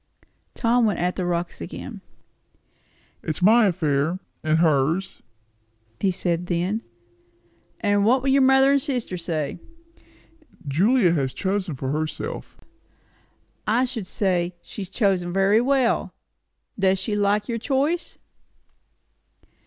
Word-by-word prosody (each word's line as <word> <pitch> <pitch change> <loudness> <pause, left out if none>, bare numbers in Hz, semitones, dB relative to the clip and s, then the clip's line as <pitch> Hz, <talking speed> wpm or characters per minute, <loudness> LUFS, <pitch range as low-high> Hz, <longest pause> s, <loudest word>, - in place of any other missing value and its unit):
Tom 235 0 +2
went 205 - 0
at 180 +1 -1
the 180 - -2
rocks 170 - -3
again. 85 - -7 1.2
"It's 155 - -3
my 220 +2 +6
affair 160 -2 0 0.3
and 155 0 +2
hers," 160 +3 +1 0.8
he 195 - +2
said 175 -1 -1
then. 180 +5 -1 1.0
"And 205 -1 +2
what 250 +4 +3
will 270 - +1
your 275 +1 +4
mother 265 +1 +5
and 280 -1 +3
sister 250 -9 -2
say?" 165 -3 -3 1.1
"Julia 190 - +3
has 135 -5 -1
chosen 190 -4 -2
for 130 +1 -3
herself." 155 +1 -4 1.1
"I 235 +4 +3
should 230 -7 -6
say, 180 -4 0
she - - -8
has 190 - -6
chosen 190 -4 0
very 195 +4 +3
well. 260 -1 +1 0.6
Does 190 0 +3
she 200 +3 -3
like 205 0 +1
your 230 -1 -2
choice." 285 +8 -1
195 Hz, 120 wpm, -23 LUFS, 170-230 Hz, 1.2 s, my